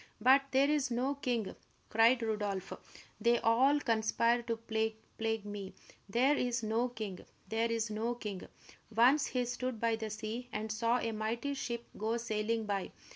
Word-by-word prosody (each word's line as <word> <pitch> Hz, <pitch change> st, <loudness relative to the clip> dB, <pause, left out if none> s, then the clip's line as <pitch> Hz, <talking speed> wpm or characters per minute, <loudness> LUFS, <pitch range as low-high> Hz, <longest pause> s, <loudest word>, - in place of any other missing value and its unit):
"But 260 Hz, +5 st, +6 dB
there 270 Hz, +1 st, +4 dB
is 295 Hz, -2 st, +1 dB
no 250 Hz, +3 st, 0 dB
king!" 245 Hz, -7 st, -2 dB, 0.3 s
cried 230 Hz, +2 st, +4 dB
Rodolph. 205 Hz, -4 st, -2 dB, 0.5 s
"They 235 Hz, 0 st, +4 dB
all 260 Hz, +7 st, +4 dB
conspire 230 Hz, -1 st, +2 dB
to 230 Hz, -1 st, -2 dB
plague 220 Hz, -1 st, -2 dB
me! 205 Hz, -2 st, -6 dB, 0.3 s
There 255 Hz, +8 st, +3 dB
is 245 Hz, -3 st, -1 dB
no 225 Hz, +3 st, +1 dB
king 215 Hz, -6 st, -6 dB, 0.3 s
there 225 Hz, +1 st, +1 dB
is 230 Hz, -1 st, -1 dB
no 225 Hz, +3 st, -1 dB
king!" 210 Hz, -5 st, -6 dB, 0.5 s
Once 260 Hz, +6 st, +5 dB
he 250 Hz, -1 st, -1 dB
stood 245 Hz, -1 st, -3 dB
by 230 Hz, 0 st, +1 dB
the 220 Hz, -1 st, -4 dB
sea 220 Hz, +3 st, -5 dB
and 215 Hz, 0 st, -3 dB
saw 230 Hz, +2 st, +2 dB
a 230 Hz, -, -2 dB
mighty 225 Hz, +6 st, -2 dB
ship 235 Hz, -3 st, -4 dB, 0.2 s
go 220 Hz, +2 st, 0 dB
sailing 225 Hz, -1 st, -1 dB
by. 200 Hz, -2 st, -2 dB
230 Hz, 160 wpm, -33 LUFS, 220-245 Hz, 0.5 s, But